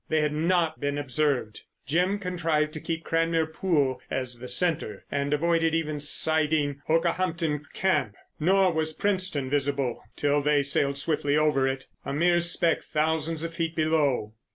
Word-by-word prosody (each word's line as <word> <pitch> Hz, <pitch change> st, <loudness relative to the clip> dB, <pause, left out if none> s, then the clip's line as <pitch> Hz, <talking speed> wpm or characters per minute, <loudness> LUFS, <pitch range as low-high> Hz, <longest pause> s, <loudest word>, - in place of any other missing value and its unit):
They 155 Hz, 0 st, +2 dB
had 150 Hz, 0 st, 0 dB
not 165 Hz, +1 st, +1 dB
been 145 Hz, 0 st, -2 dB
observed. 140 Hz, -5 st, -1 dB, 0.2 s
Jim 180 Hz, -, +1 dB
contrived 165 Hz, -5 st, -1 dB
to 155 Hz, -, -6 dB
keep 165 Hz, 0 st, -4 dB
Cranmere 165 Hz, 0 st, +1 dB
Pool 145 Hz, -9 st, 0 dB
as 125 Hz, -2 st, -3 dB
the 125 Hz, -, -8 dB
centre 125 Hz, -, 0 dB
and 140 Hz, 0 st, -1 dB
avoided 165 Hz, +1 st, +1 dB
even 155 Hz, -2 st, -2 dB
sighting 150 Hz, -1 st, +2 dB
Okehampton 165 Hz, -2 st, 0 dB
Camp, 185 Hz, -, 0 dB, 0.2 s
nor 185 Hz, +2 st, +3 dB
was 160 Hz, 0 st, -1 dB
Princetown 185 Hz, -8 st, -1 dB
visible 140 Hz, -3 st, -1 dB
till 145 Hz, 0 st, +1 dB
they 145 Hz, 0 st, +2 dB
sailed 140 Hz, 0 st, +1 dB
swiftly 145 Hz, 0 st, 0 dB
over 150 Hz, -3 st, +2 dB
it—a 135 Hz, +1 st, -6 dB
mere 175 Hz, +3 st, +3 dB
speck 170 Hz, -1 st, +2 dB
thousands 160 Hz, +1 st, -1 dB
of 165 Hz, 0 st, -4 dB
feet 165 Hz, -1 st, -3 dB
below. 150 Hz, -9 st, +1 dB
155 Hz, 150 wpm, -26 LUFS, 145-165 Hz, 0.2 s, nor